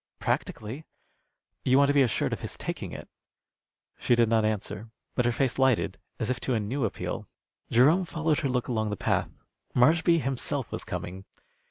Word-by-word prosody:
"Practically." 115 +8 -2 0.8
"You 130 +1 +4
want 140 0 +5
to - - +4
be 140 - +5
assured 120 -7 +1
of - - -3
his - - -6
taking - - -4
it." - - -8 0.9
She 120 - +3
did 115 -1 +3
not 115 -1 +3
answer; 110 0 -2 0.2
but 125 - +1
her 120 - +3
face 130 +1 0
lighted, 130 -3 +2 0.2
as 115 - -1
if 125 - -2
to 130 - -1
a - - +1
new 115 +5 -1
appeal. 105 - -4 0.4
Jerome 150 +10 +5
followed 160 -2 0
her 140 - -1
look 125 -1 0
along 110 -3 0
the 105 - -3
path. - - 0 0.5
Marshby 165 +6 +5
himself 135 -1 -2
was - - -4
coming. 95 +2 -6
125 Hz, 180 wpm, -28 LUFS, 110-140 Hz, 0.9 s, want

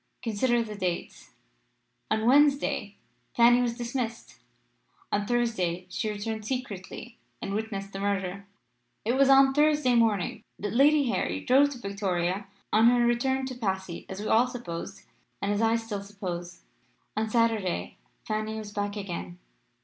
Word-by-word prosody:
Consider 235 +2 +1
the 215 -2 -7
dates. 185 -4 -4 0.8
On 220 0 +1
Wednesday 285 +3 +3 0.4
Fanny 240 +1 +6
was 240 -1 -1
dismissed; 240 -2 -4 0.7
on 205 0 0
Thursday 205 -8 0
she 215 - -2
returned 215 +1 -4
secretly 240 -1 -6 0.2
and 195 - -4
witnessed 200 -2 -4
the 195 - -5
murder. 200 -1 -2 0.6
It 230 - +2
was 270 +1 +4
on 270 0 +7
Thursday 295 -3 +3
morning 220 -6 +2 0.2
that 205 0 -4
Lady 285 +2 +5
Harry - - -1
drove 275 +3 +5
to - - -9
Victoria 195 -3 -2 0.3
on 220 +2 +6
her 240 0 +4
return 265 +3 +1
to 260 -1 -5
Passy, 190 -6 -3
as 190 - -6
we 215 - -4
all 235 +3 +4
supposed, 195 -5 -7 0.4
and 200 - -1
as 205 +1 0
I 225 0 +3
still 225 -3 -3
suppose. 185 -4 -6 0.5
On 220 +1 -1
Saturday 215 - 0 0.2
Funny 215 0 -2
was 215 -1 -7
back 205 0 -3
again. 170 - -5
220 Hz, 145 wpm, -28 LUFS, 195-245 Hz, 0.8 s, on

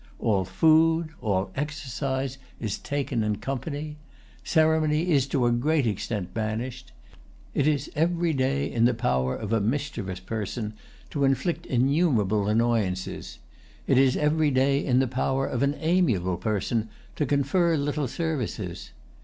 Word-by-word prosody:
All 100 -4 +1
food, 160 - +3
all 100 -3 0
exercise, 135 -2 -3 0.2
is 105 -3 -3
taken 140 -5 -2
in 105 -1 0
company. 145 +6 -4 0.5
Ceremony 160 +1 +2
is 140 -3 +3
to 135 -3 +1
a 120 - +3
great 140 +4 +2
extent 105 -3 -3
banished. 120 +4 -4 0.6
It 145 - +1
is 145 -2 0
every 170 +1 +1
day 135 +1 +1
in 115 -1 +1
the 125 0 +3
power 65 - 0
of 110 0 -4
a 115 - +2
mischievous 110 -6 -2
person 105 +2 -4 0.4
to 145 - -1
inflict 135 +6 0
innumerable 125 - +2
annoyances; 105 - 0 0.5
it - - +4
is 135 -1 +4
every 150 +1 +2
day 135 +1 +2
in 125 -3 +2
the 130 0 +3
power 130 +2 0
of 125 - -2
an 140 +1 +2
amiable 135 - +1
person 110 +3 -1 0.3
to 150 - -1
confer 155 +5 +2
little 145 0 -1
services. 120 - -3
130 Hz, 140 wpm, -26 LUFS, 110-150 Hz, 0.6 s, it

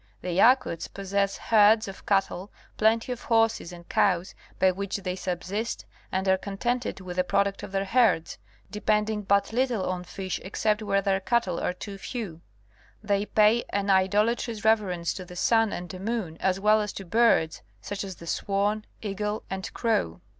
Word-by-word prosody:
The 180 - -3
Yakuts 195 -2 +3
possess 200 0 -1
herds 215 0 +4
of 195 - -10
cattle, 195 -1 0 0.2
plenty 225 +3 +2
of 245 -1 -4
horses 225 -6 +1
and 170 -1 -12
cows 180 -2 +1 0.2
by 190 - +4
which 195 +2 -3
they 185 -2 -4
subsist, 190 +5 -3 0.3
and 190 +1 -1
are 190 0 +3
contented 235 +3 -2
with 180 -1 -7
the 180 - +3
product 200 +2 0
of - - -8
their 195 0 -1
herds, 205 -6 +2 0.3
depending 210 0 0
but 200 +2 +1
little 245 -5 0
on 180 -1 -2
fish 185 +1 -5
except 210 +3 0
where 195 -2 +1
their 195 -1 +2
cattle 195 -4 0
are - - -1
too 195 +1 -8
few. 195 -9 -6 0.6
They 205 0 0
pay 215 +2 +4
an 200 0 0
idolatrous 210 +4 +1
reverence 190 -6 +2
to 185 - -7
the 180 0 -12
sun 225 +3 +3
and 175 +1 -6
moon 200 -6 -3
as 190 0 +1
well 215 +2 +4
as 210 -1 -4
to 195 - -7
birds, 200 -5 +3 0.2
such 205 0 -5
as 190 -2 -6
the 170 - -12
swan, 205 +4 -1 0.2
eagle 210 +1 -3
and 190 0 -4
crow. 155 - 0
200 Hz, 170 wpm, -27 LUFS, 185-220 Hz, 0.6 s, herds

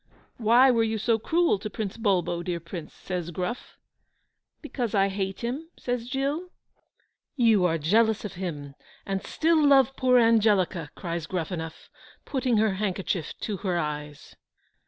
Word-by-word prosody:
"Why 245 +4 +5
were 230 -2 +2
you 220 0 0
so 225 +2 +1
cruel 330 - +2
to 215 - -5
Prince 205 -1 -4
Bulbo, 185 -6 0
dear 175 0 -3
Prince?" 170 -1 -8
says 180 -3 -4
Gruff. 180 - -5 0.8
"Because 245 -8 -3
I 195 0 +3
hate 195 -1 -3
him," 265 +8 -4
says 245 -1 -3
Giglio. 285 +7 -2 0.9
"You 225 -8 +4
are 165 -2 +2
jealous 215 +8 +2
of 205 - -5
him, 150 -6 -5 0.3
and 195 0 -2
still 320 -1 +2
love 270 -2 +5
poor 255 -1 +4
Angelica," 205 -8 +3
cries 170 -2 -4
Gruffanuff, 165 -2 -5 0.4
putting 255 -4 0
her 215 0 +3
handkerchief 190 -4 -2
to 210 -3 -3
her 185 -2 -1
eyes. 150 -2 -5
205 Hz, 145 wpm, -26 LUFS, 175-240 Hz, 0.9 s, Why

